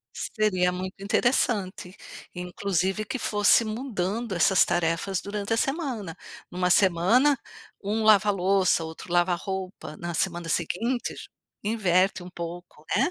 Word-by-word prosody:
Seria 185 Hz, -5 st, 0 dB
muito 185 Hz, +2 st, -6 dB
interessante, 200 Hz, -4 st, 0 dB, 0.4 s
inclusive 185 Hz, +2 st, -2 dB
que 260 Hz, -, -4 dB
fosse 210 Hz, +1 st, +4 dB
mudando 215 Hz, -2 st, -3 dB
essas 180 Hz, +2 st, +4 dB
tarefas 175 Hz, +2 st, 0 dB
durante 205 Hz, +1 st, -4 dB
a 225 Hz, -, +3 dB
semana. 255 Hz, -, -2 dB, 0.3 s
Numa 180 Hz, 0 st, 0 dB
semana, 200 Hz, +10 st, +4 dB, 0.4 s
um 210 Hz, +3 st, -1 dB
lava 215 Hz, -1 st, +5 dB
louça, 190 Hz, -2 st, +2 dB
outro 160 Hz, +2 st, -8 dB
lava 175 Hz, +1 st, +3 dB
a -, -, +3 dB
roupa, 190 Hz, -4 st, -6 dB
na 170 Hz, 0 st, -5 dB
semana 170 Hz, 0 st, -1 dB
seguinte 230 Hz, +10 st, -1 dB, 0.5 s
inverte 190 Hz, -4 st, +1 dB
um 180 Hz, -, -10 dB
pouco, 170 Hz, -2 st, -8 dB
né. 270 Hz, +9 st, +2 dB
190 Hz, 130 wpm, -26 LUFS, 175-215 Hz, 0.5 s, lava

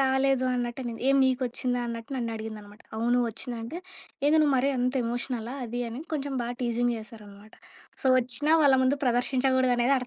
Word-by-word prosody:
రాలేదు 265 Hz, -1 st, +2 dB
అన్నట్ట‌నింది. 240 Hz, -1 st, -3 dB
ఏం 275 Hz, -, +5 dB
‌నికొచ్చిందా 250 Hz, -1 st, 0 dB
అన్నట్టు 230 Hz, 0 st, -6 dB
నన్ను 235 Hz, -2 st, -2 dB
అడిగిందన్నమాట. 215 Hz, -1 st, -9 dB, 0.2 s
అవును 240 Hz, +2 st, +2 dB
ఒచ్చింది 240 Hz, +2 st, -6 dB
అంటే. 295 Hz, +9 st, -6 dB, 0.5 s
ఏందో 300 Hz, +2 st, +5 dB
నువ్వు 290 Hz, -2 st, +3 dB
మరి 265 Hz, +2 st, +2 dB
అంత 250 Hz, +1 st, 0 dB
ఎమోషనలా 240 Hz, 0 st, -3 dB
అది 240 Hz, +1 st, -4 dB
అని 235 Hz, +4 st, -6 dB
కొంచెం 285 Hz, -1 st, -3 dB
బాగా 240 Hz, +1 st, -3 dB
టీజింగ్ 240 Hz, 0 st, +1 dB
జేస్తారన్నమట. 215 Hz, -2 st, -12 dB, 0.5 s
సో, -, -, 0 dB
ఒచ్చినా 255 Hz, +5 st, 0 dB
వాళ్ళ 275 Hz, -2 st, +6 dB
ముందు 275 Hz, +2 st, +2 dB
ప్రదర్శించకూడదు 255 Hz, +1 st, +2 dB
అనేది 240 Hz, +3 st, +3 dB
245 Hz, 160 wpm, -27 LUFS, 230-265 Hz, 0.5 s, వాళ్ళ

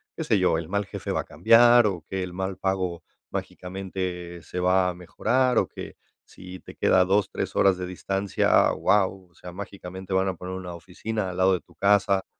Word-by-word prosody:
qué 160 Hz, -, -4 dB
sé 110 Hz, -9 st, +2 dB
yo, 90 Hz, -3 st, +2 dB
el 85 Hz, 0 st, -5 dB
mal 100 Hz, 0 st, -1 dB
jefe -, -, -6 dB
va -, -, 0 dB
a -, -, -10 dB
cambiar 115 Hz, +9 st, +5 dB
o 85 Hz, -5 st, -4 dB
que 95 Hz, -1 st, -2 dB
el 90 Hz, -, -6 dB
mal 95 Hz, +1 st, -4 dB
pago 95 Hz, -3 st, -2 dB, 0.3 s
mágicamente 90 Hz, -2 st, -5 dB
se 90 Hz, -, -6 dB
va 90 Hz, 0 st, +3 dB
a -, -, -3 dB
mejorar 125 Hz, +9 st, 0 dB
o -, -, +3 dB
que -, -, -9 dB, 0.3 s
si 90 Hz, 0 st, -11 dB
te -, -, -13 dB
queda 95 Hz, -, +3 dB
a -, -, +4 dB
2, 100 Hz, +1 st, +2 dB
3 -, -, -4 dB
horas 95 Hz, -2 st, +4 dB
de 90 Hz, -, -4 dB
distancia, 95 Hz, +2 st, -1 dB, 0.2 s
ah, -, -, 0 dB
wao, 95 Hz, -2 st, +1 dB
o 85 Hz, -, -32 dB
sea, 90 Hz, -, -10 dB
mágicamente 95 Hz, 0 st, -9 dB
van 95 Hz, +1 st, +2 dB
a 95 Hz, -, 0 dB
poner 90 Hz, +2 st, -7 dB
una 90 Hz, -2 st, -6 dB
oficina 95 Hz, +4 st, -4 dB
al 90 Hz, -, -7 dB
lado 95 Hz, 0 st, +4 dB
de 90 Hz, -, -1 dB
tu -, -, -24 dB
casa, 100 Hz, -1 st, +2 dB
95 Hz, 220 wpm, -25 LUFS, 90-100 Hz, 0.3 s, cambiar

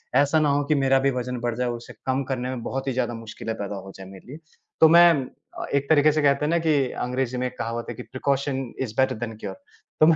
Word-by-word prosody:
ऐसा 145 Hz, +3 st, +4 dB
ना 150 Hz, -1 st, +2 dB
हो 145 Hz, +1 st, +2 dB
कि 155 Hz, +1 st, +2 dB
मेरा 135 Hz, -1 st, +3 dB
भी 135 Hz, +1 st, +2 dB
वज़न 125 Hz, -1 st, -3 dB
बढ़ 120 Hz, -1 st, -1 dB
जाए, 125 Hz, 0 st, 0 dB
उसे 120 Hz, 0 st, -7 dB
कम 130 Hz, +1 st, 0 dB
करने 125 Hz, -1 st, -2 dB
में 130 Hz, -2 st, -4 dB
बहुत 135 Hz, +3 st, -4 dB
ही 135 Hz, -, 0 dB
ज़्यादा 120 Hz, -1 st, -1 dB
मुश्किलें 115 Hz, 0 st, -6 dB
पैदा 100 Hz, -1 st, -5 dB
हो 95 Hz, 0 st, -8 dB
जाए 95 Hz, -, -10 dB
मेरे 95 Hz, -1 st, -13 dB
लिए। 140 Hz, +4 st, -8 dB, 0.4 s
तो 160 Hz, -, +10 dB
मैं 170 Hz, +1 st, +8 dB, 0.5 s
अ, -, -, -3 dB
एक 140 Hz, 0 st, 0 dB
तरीके 155 Hz, -1 st, +5 dB
से 155 Hz, +1 st, 0 dB
कहते 140 Hz, 0 st, +3 dB
हैं -, -, 0 dB
ना 170 Hz, -, +3 dB
कि 160 Hz, -, +4 dB, 0.3 s
अंग्रेज़ी 125 Hz, 0 st, -2 dB
में 125 Hz, -, -1 dB
एक 125 Hz, -, -10 dB
कहावत 115 Hz, +2 st, -3 dB
है -, -, -3 dB
कि, 125 Hz, -, -8 dB
"precaution 140 Hz, +1 st, -1 dB, 0.2 s
is 120 Hz, -5 st, -3 dB
better 130 Hz, -1 st, +2 dB
than 115 Hz, 0 st, -5 dB
cure" -, -, -6 dB, 0.5 s
तो -, -, +9 dB
मैं 165 Hz, -, +6 dB
130 Hz, 265 wpm, -24 LUFS, 120-140 Hz, 0.5 s, तो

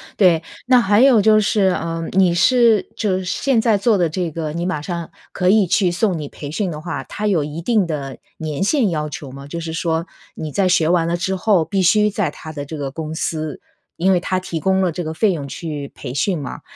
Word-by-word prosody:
对。 175 Hz, -5 st, +4 dB, 0.2 s
那 255 Hz, 0 st, +5 dB
还 205 Hz, 0 st, +3 dB
有 255 Hz, -5 st, +6 dB
就 215 Hz, +1 st, +5 dB
是， 200 Hz, -2 st, +2 dB
呃， 165 Hz, 0 st, -3 dB
你 185 Hz, -2 st, +4 dB
是 230 Hz, +2 st, +4 dB
就 195 Hz, -4 st, 0 dB
是 185 Hz, -, -6 dB
现 250 Hz, +6 st, +1 dB
在 225 Hz, -2 st, +3 dB
做 210 Hz, +1 st, +2 dB
的 175 Hz, -2 st, +2 dB
这 170 Hz, 0 st, -3 dB
个， 155 Hz, -1 st, -4 dB
你 170 Hz, +1 st, -3 dB
马 180 Hz, -5 st, -2 dB
上 170 Hz, 0 st, -5 dB, 0.2 s
可 180 Hz, -, +1 dB
以 205 Hz, -1 st, +4 dB
去 185 Hz, 0 st, +2 dB
送 180 Hz, 0 st, 0 dB
你 150 Hz, -2 st, -6 dB
培 145 Hz, -, -8 dB
训 185 Hz, +2 st, -2 dB
的 150 Hz, -, -6 dB
话， 155 Hz, -4 st, -5 dB
它 210 Hz, +9 st, -4 dB
有 180 Hz, -7 st, +2 dB
一 150 Hz, +3 st, -6 dB
定 210 Hz, +2 st, +2 dB
的 140 Hz, -5 st, -5 dB, 0.2 s
年 155 Hz, +1 st, -3 dB
限 230 Hz, +1 st, +2 dB
要 150 Hz, -3 st, -2 dB
求 150 Hz, -2 st, -7 dB
吗？ 135 Hz, +1 st, -10 dB
就 170 Hz, +4 st, -6 dB
是 165 Hz, -1 st, -5 dB
说， 165 Hz, +1 st, -1 dB, 0.3 s
你 155 Hz, -1 st, -5 dB
在 190 Hz, -2 st, +2 dB
学 165 Hz, -3 st, +3 dB
完 170 Hz, -1 st, +2 dB
了 170 Hz, +1 st, 0 dB
之 190 Hz, +2 st, -1 dB
后， 185 Hz, -3 st, +2 dB
必 195 Hz, +2 st, 0 dB
须 210 Hz, +4 st, +4 dB
在 205 Hz, -1 st, -1 dB
它 155 Hz, -, -10 dB
的 145 Hz, -2 st, -5 dB
这 155 Hz, +2 st, -7 dB
个 140 Hz, -2 st, -4 dB
公 155 Hz, +1 st, -5 dB
司， 155 Hz, -2 st, -3 dB, 0.4 s
因 190 Hz, +3 st, +3 dB
为 180 Hz, -, +2 dB
它 185 Hz, +1 st, -1 dB
提 180 Hz, -4 st, -5 dB
供 190 Hz, +3 st, +2 dB
了 185 Hz, -, +2 dB
这 175 Hz, -, -4 dB
个 160 Hz, 0 st, -4 dB
费 200 Hz, +4 st, +2 dB
用 150 Hz, -5 st, -4 dB
去 145 Hz, -2 st, -6 dB
培 125 Hz, -, -7 dB
训 170 Hz, +5 st, 0 dB
嘛， 140 Hz, -, -7 dB
175 Hz, 260 characters per minute, -19 LUFS, 155-195 Hz, 0.4 s, 有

